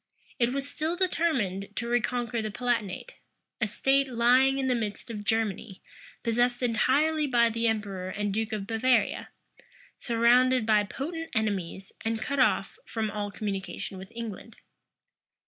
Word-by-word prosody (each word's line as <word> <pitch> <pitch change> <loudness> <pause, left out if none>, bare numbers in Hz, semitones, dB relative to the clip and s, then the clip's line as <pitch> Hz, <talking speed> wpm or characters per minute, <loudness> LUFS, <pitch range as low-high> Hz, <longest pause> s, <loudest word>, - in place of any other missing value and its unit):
It 240 0 +3
was 275 +1 -2
still 315 +3 -2
determined 250 - 0
to 235 - -2
reconquer 240 -1 0
the 215 - -3
Palatinate; 240 - -2 0.4
a 215 - +2
state 275 +6 +2
lying 255 +3 +4
in 270 - 0
the 260 - +2
midst 225 0 -3
of 210 -2 -5
Germany, 220 -2 -1 0.4
possessed 240 +2 +1
entirely 290 +6 +2
by 235 -3 +4
the 230 +1 0
emperor 200 -4 -2
and 205 +1 -2
duke 220 +1 -1
of 210 -2 -3
Bavaria, 225 0 +1 0.7
surrounded 245 +1 +4
by 210 -2 +4
potent 325 - -5
enemies, 195 -4 -2
and 225 0 -1
cut 275 +6 -2
off 225 -6 +2
from 220 -2 -2
all 205 0 -3
communication 195 -2 -4
with 190 +3 -10
England. 230 -1 -7
230 Hz, 145 wpm, -28 LUFS, 210-255 Hz, 0.7 s, lying